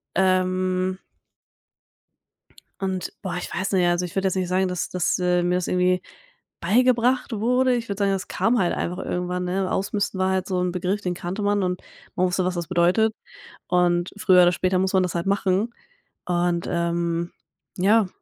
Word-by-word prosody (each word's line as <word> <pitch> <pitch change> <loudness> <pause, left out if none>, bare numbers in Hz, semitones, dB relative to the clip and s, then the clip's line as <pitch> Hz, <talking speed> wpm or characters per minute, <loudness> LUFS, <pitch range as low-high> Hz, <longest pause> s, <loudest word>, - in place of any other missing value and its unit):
Ähm 185 0 +1 1.8
und, 190 -1 -3
boah, 185 -3 -4
ich - - -6
weiß 185 +3 -2
nicht, 185 -2 +3
also 175 +1 +1
ich 175 - -9
würde 195 0 +1
jetzt 190 - -1
nicht 185 -1 -1
sagen, 185 +1 +2
dass 180 -1 -3
das 180 -2 0
äh, 180 -1 +2
mir 180 0 +1
das 180 - -1
irgendwie 180 0 +2 0.6
beigebracht 245 +6 +2
wurde. 250 +4 +2
Ich 230 -2 -4
würde 200 0 -3
sagen, 200 -1 +2
das 195 0 -2
kam 240 +2 +1
halt 175 - +1
einfach 180 +2 -3
irgendwann, 180 0 -2
ne? 185 +1 -1
Ausmisten 200 -1 -1
war 190 0 +2
halt 190 -1 -1
so 185 -2 -1
'n 180 -1 0
Begriff, 185 +3 -2
den 180 -2 -2
kannte 180 +4 -5
man 205 -1 +1
und 180 0 -2 0.3
man 185 - +2
wusste, 180 0 0
was 180 -1 -1
das 170 -1 -3
bedeutet, 185 +5 +2 0.5
und 175 0 +2
früher 185 -3 +5
oder 175 - +5
später 185 +1 +1
muss 190 +1 0
man 190 -1 +4
das 180 - -3
halt 170 - -1
machen. 200 +3 +1 0.5
Und, 175 -1 0
ähm 170 0 -1 0.5
ja. 205 +2 +4
185 Hz, 185 wpm, -23 LUFS, 180-195 Hz, 1.8 s, früher